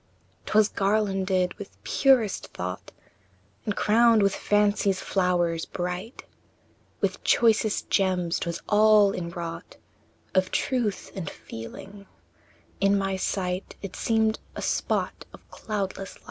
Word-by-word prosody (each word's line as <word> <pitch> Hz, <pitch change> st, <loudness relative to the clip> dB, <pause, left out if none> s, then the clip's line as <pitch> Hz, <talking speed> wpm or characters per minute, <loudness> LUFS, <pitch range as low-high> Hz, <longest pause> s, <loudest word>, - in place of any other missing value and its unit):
II. -, -, -38 dB
'Twas 215 Hz, 0 st, +4 dB
garlanded 195 Hz, -3 st, +1 dB
with 205 Hz, -, -10 dB
purest 255 Hz, -7 st, +2 dB
thought, 90 Hz, +1 st, -5 dB, 0.7 s
And 210 Hz, -, -1 dB
crowned 225 Hz, 0 st, +4 dB
with 200 Hz, -1 st, +3 dB
fancy's 205 Hz, -2 st, +2 dB
flowers 175 Hz, -3 st, 0 dB
bright, 180 Hz, +6 st, -5 dB, 0.8 s
With -, -, -1 dB
choicest 220 Hz, -2 st, +2 dB
gems 185 Hz, -3 st, +1 dB
'twas 170 Hz, 0 st, -4 dB
all 210 Hz, -1 st, +5 dB
inwrought 170 Hz, -1 st, -6 dB, 0.6 s
Of 185 Hz, -1 st, +2 dB
truth 235 Hz, -6 st, -1 dB
and 180 Hz, -6 st, -5 dB
feeling; 195 Hz, -, -10 dB, 0.7 s
in 200 Hz, 0 st, +3 dB
my 195 Hz, -1 st, -1 dB
sight 185 Hz, 0 st, -2 dB
It 195 Hz, -2 st, -6 dB
seemed 220 Hz, -1 st, +1 dB, 0.2 s
a -, -, -5 dB
spot -, -, -1 dB
of -, -, -15 dB
cloudless 195 Hz, -2 st, -4 dB
light. -, -, -19 dB
195 Hz, 120 wpm, -26 LUFS, 180-210 Hz, 0.8 s, all